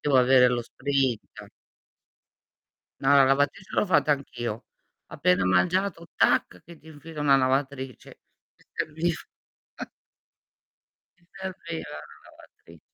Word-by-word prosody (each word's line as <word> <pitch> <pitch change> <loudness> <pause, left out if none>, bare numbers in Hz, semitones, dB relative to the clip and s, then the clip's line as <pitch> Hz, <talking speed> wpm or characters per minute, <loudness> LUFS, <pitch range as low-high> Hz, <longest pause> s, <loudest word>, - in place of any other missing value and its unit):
devo 145 -2 +2
avere 125 0 +6
lo 120 -1 -1
sprint. 135 -2 -3 1.5
No, - - 0
la 140 - +7
lavatrice 145 +7 0
l'ho - - +2
fatta 150 -5 +2
anch'io. 120 -5 -5 0.4
Appena 90 +1 +1
mangiato, 165 - +1
tac, 90 - +1
che 170 0 -13
ti 160 - -18
infilo 155 0 -10
una 140 -2 +5
lavatrice. 135 0 -2 0.4
Mi - - -27
serviv 160 +2 -2 2.0
Mi 175 - -30
serviva 170 - -6
la - - -16
lavatri 85 -1 -18
140 Hz, 110 wpm, -26 LUFS, 125-160 Hz, 2.0 s, la